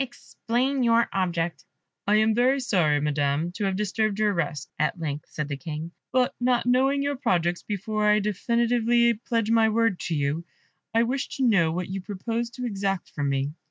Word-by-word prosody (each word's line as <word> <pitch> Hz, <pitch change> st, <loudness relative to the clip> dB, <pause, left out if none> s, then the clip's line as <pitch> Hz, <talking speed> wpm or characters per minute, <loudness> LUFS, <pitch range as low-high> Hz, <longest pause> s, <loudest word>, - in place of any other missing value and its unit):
"Explain 255 Hz, +1 st, -2 dB
your 235 Hz, -1 st, +4 dB
object." 170 Hz, -5 st, -1 dB, 0.4 s
"I 205 Hz, -, +4 dB
am 215 Hz, +1 st, +4 dB
very 255 Hz, +4 st, +3 dB
sorry, 175 Hz, -, +2 dB
Madam, 145 Hz, +2 st, 0 dB
to 200 Hz, +3 st, -3 dB
have 190 Hz, -1 st, 0 dB
disturbed 210 Hz, +1 st, 0 dB
your 210 Hz, -1 st, +2 dB
rest," 165 Hz, -3 st, -2 dB
at 155 Hz, +3 st, +1 dB
length 150 Hz, -2 st, -4 dB
said 150 Hz, -2 st, -4 dB
the 145 Hz, -1 st, -4 dB
King; 155 Hz, +3 st, -6 dB, 0.2 s
"but 255 Hz, -1 st, +2 dB
not 245 Hz, -1 st, +2 dB
knowing 265 Hz, +3 st, +3 dB
your 285 Hz, 0 st, -1 dB
projects, 175 Hz, -, 0 dB
before 210 Hz, +1 st, -2 dB
I 210 Hz, -, +5 dB
definitively 235 Hz, +3 st, +2 dB
pledge 225 Hz, 0 st, -1 dB
my 225 Hz, -1 st, +4 dB
word 225 Hz, -3 st, +1 dB
to 165 Hz, -, 0 dB
you 145 Hz, +3 st, -1 dB, 0.5 s
I 230 Hz, +1 st, +3 dB
wish 260 Hz, +3 st, -2 dB
to 265 Hz, -, +1 dB
know 170 Hz, -8 st, +3 dB
what 180 Hz, +2 st, -3 dB
you 190 Hz, 0 st, -4 dB
propose 225 Hz, +5 st, -3 dB
to 250 Hz, -, -3 dB
exact 195 Hz, -4 st, -2 dB
from 145 Hz, -1 st, -2 dB
me." 140 Hz, +1 st, -1 dB
210 Hz, 185 wpm, -25 LUFS, 165-235 Hz, 0.5 s, I